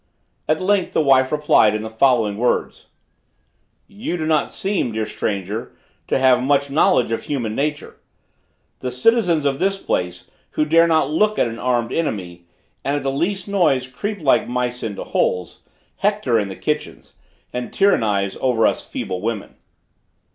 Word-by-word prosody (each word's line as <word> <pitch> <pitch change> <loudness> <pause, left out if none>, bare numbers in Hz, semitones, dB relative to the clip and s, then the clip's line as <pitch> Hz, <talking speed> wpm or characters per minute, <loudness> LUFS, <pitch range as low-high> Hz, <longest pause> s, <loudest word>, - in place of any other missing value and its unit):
At 155 - +2
length, 190 0 +1
the - - +3
wife 130 -2 +4
replied 150 -8 +4
in 110 - -3
the - - -4
following 110 -3 +2
words: 120 +2 -1 1.0
"You 205 -3 -4
do 160 - -3
not 155 -2 +1
seem, 190 - -1
dear 110 0 -1
stranger! 105 0 -4 0.3
to - - +1
have 130 -1 +4
much 140 +1 +1
knowledge 125 -5 +3
of 115 - -2
human 120 -7 -2
nature. 145 +4 -3 0.8
The 125 - -4
citizens 170 - +2
of 135 -1 0
this 195 +1 +1
place, 90 - -3 0.3
who 155 - +3
dare 165 +2 +5
not 160 -3 +2
look 210 +6 +2
at - - +2
an 115 0 -7
armed 120 -2 0
enemy, 90 - -3 0.4
and, 140 - 0
at 145 - -2
the 135 - 0
least 180 +7 -2
noise, 170 -10 +2
creep 200 +12 -5
like 140 - +3
mice 125 0 -2
into 105 -3 -4
holes, 90 -2 -1 0.4
hector 200 - +1
in 100 -2 -2
the 95 - -6
kitchens, 150 +7 -4 0.4
and 125 0 -4
tyrannize 105 - +1
over 125 -4 +2
us - - +1
feeble 90 -1 -5
women." 110 -1 -4
130 Hz, 160 wpm, -20 LUFS, 110-160 Hz, 1.0 s, dare